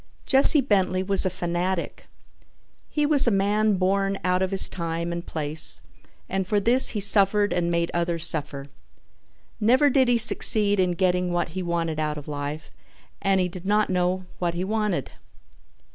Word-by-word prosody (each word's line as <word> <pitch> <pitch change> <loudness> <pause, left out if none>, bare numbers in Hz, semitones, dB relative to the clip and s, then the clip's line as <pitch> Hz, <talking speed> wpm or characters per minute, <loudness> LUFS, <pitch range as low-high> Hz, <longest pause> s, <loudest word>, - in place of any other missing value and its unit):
Jesse 275 +2 +7
Bentley 190 -6 -1
was 195 0 +3
a - - 0
fanatic. 175 0 -5 0.8
He 300 -1 -1
was 290 -3 +4
a - - +5
man 205 +1 0
born 195 +1 -1
out 180 0 -1
of 190 - -1
his 195 0 +2
time 170 -1 -5
and 170 0 -6
place 155 -1 -2 0.5
and 190 -1 -4
for 205 +2 0
this 240 +6 +4
he - - -1
suffered 205 0 +3
and 175 -1 -2
made 170 0 -2
others 170 -1 0
suffer. 145 -4 -1 0.9
Never 255 +6 +2
did 260 -1 +2
he 240 -1 +2
succeed 210 -3 +4
in 180 -1 0
getting 180 0 -1
what 175 -1 -2
he 185 +3 -6
wanted 170 -3 -3
out 150 -1 -3
of 145 - -10
life 145 +1 -7 0.5
and 195 -1 0
he 180 - 0
did 180 +1 -10
not 210 -1 0
know 180 +1 -2
what 175 -1 -3
he 175 - -3
wanted. 210 - -3
185 Hz, 170 wpm, -23 LUFS, 170-205 Hz, 0.9 s, Jesse